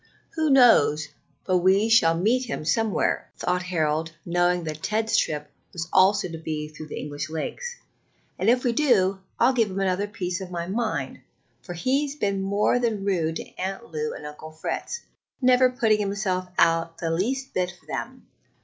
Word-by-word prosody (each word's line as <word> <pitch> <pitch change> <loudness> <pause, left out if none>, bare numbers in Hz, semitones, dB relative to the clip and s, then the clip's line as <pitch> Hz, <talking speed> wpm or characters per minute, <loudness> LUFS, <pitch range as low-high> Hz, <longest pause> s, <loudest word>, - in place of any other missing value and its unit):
"Who 315 -2 +1
knows 160 - +5 0.4
but 185 -1 +2
we 190 +4 +4
shall 165 -8 +5
meet 235 +8 +2
him 225 -10 -5
somewhere?" 225 +4 0
thought 180 0 0
Harold, 160 -3 -1
knowing 175 0 +1
that 155 -1 -5
Ted's 220 +1 0
trip 150 -8 0 0.2
was 165 -2 -4
also 190 +1 +4
to 165 -2 -7
be 155 -1 -4
through 155 0 -10
the - - -7
English 150 +2 -5
Lakes; 480 - -4 0.6
"and 195 - +2
if 250 +1 +3
we 245 -3 +1
do, 200 -9 +3 0.2
I'll 265 - +5
give 230 -4 +2
him 190 +1 -4
another 195 +1 0
piece 185 -3 -4
of 185 - -6
my 170 -1 -4
mind, 215 +4 -2 0.4
for 175 - -7
he's 275 - 0
been 200 -8 -1
more 200 +5 +2
than 220 -5 -1
rude 165 -5 0
to - - -5
Aunt 195 +3 -4
Lou 155 -1 -2
and 150 - -9
Uncle 150 +1 -9
Fritz, 160 - -4 0.4
never 255 0 +5
putting 225 -4 +2
himself 195 -2 -1
out 165 0 +2
the 165 -1 -2
least 260 +11 -1
bit 180 -1 0
for - - -28
them. - - -6
190 Hz, 175 wpm, -25 LUFS, 165-225 Hz, 0.6 s, knows